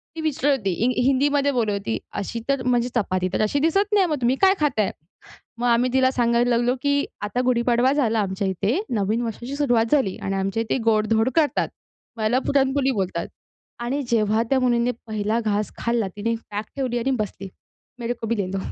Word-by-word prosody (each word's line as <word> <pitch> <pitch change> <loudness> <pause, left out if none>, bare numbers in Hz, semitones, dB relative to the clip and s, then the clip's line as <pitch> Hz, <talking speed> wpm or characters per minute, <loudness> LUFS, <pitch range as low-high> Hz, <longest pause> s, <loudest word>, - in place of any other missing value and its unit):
ती 325 - -4
विचारत 285 -2 +1
होती. 200 -6 -2
हि 250 0 +1
हिंदीमध्ये 280 +1 +2
बोलत 235 -5 0
होती. 200 +2 -2 0.2
अशी 230 +4 -4
तर 275 -2 +1
म्हणजे 245 -1 +2
चपाती 185 -5 0
तर - - +1
अशी 215 +7 +1
दिसत 390 +7 +1
नाही, 400 -2 +5
मग 300 -5 -2
तुम्ही 245 +2 +2
काय 385 0 +6
खाताय? 250 -10 +1 0.7
मग 240 - -1
आम्ही 240 +1 +2
तिला 260 0 +4
सांगायला 240 -1 +2
लागलो, 240 +1 +2
की 285 0 +2 0.2
आता 210 +4 -2
गुढीपाडवा 245 +1 +2
झाला 230 -6 +1
आमच्या 195 0 -2
इथे, 205 - 0
नवीन 215 +2 0
वर्षाची 240 +4 -5
सुरुवात 245 -6 +2
झाली. 265 -11 +2
आणि 195 0 -2
आमच्या 195 +3 -1
इथे 220 - -1
गोड-धोड 220 +1 +2
करतात. 310 -3 +2 0.5
ह्याला 220 +3 +2
पुरणपोळी 270 0 +2
बोलतात 190 -7 -2 0.6
आणि 270 +4 -1
जेव्हा 220 -1 +2
त्या 270 - +4
मुलीने 240 -1 +2 0.2
पहिला 215 0 -1
घास 210 -1 0
खाल्ला. 235 -3 0
तिने 230 +3 -1 0.2
बॅग 210 +1 -3
ठेवली 255 -3 -1
आणि 245 +3 -1
बसली, 200 -2 -4 0.5
"मेरे 235 0 -2
को 225 - -3
भी 230 +1 0
ले 200 -3 -1
लो." 195 - -1
235 Hz, 190 wpm, -23 LUFS, 215-265 Hz, 0.7 s, काय